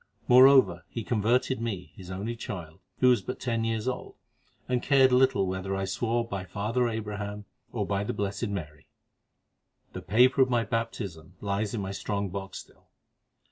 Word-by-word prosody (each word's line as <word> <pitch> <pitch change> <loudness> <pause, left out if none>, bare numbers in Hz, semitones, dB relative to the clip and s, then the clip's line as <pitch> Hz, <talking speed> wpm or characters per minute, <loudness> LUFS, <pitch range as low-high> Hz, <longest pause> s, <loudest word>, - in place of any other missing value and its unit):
Moreover, 130 +2 +6
he 115 - -5
converted 120 +3 +1
me, 100 -6 -4
his 95 -4 -11
only 100 +5 -4
child, 85 -8 -7 0.2
who 130 - +6
was 120 -5 +4
but 125 - -6
ten 115 -3 -1
years 115 0 -1
old, 130 - -4 0.5
and 125 -1 0
cared 135 -1 +5
little 130 -5 +4
whether 95 +1 -3
I 95 0 -1
swore 115 +4 -1
by 100 -4 -4
'Father 110 +5 -1
Abraham' 105 -2 -5 0.3
or 105 -4 -2
by 100 0 -1
the - - -2
'Blessed 100 +3 -2
Mary.' 75 -8 -6 1.1
The 95 - -6
paper 125 +8 +4
of 130 - +4
my 120 -2 +2
baptism 100 -7 -4
lies 100 +2 -2
in 105 - -2
my 95 0 -4
strong 100 0 -3
box 95 0 -6
still. - - -14
105 Hz, 170 wpm, -28 LUFS, 95-120 Hz, 1.1 s, Moreover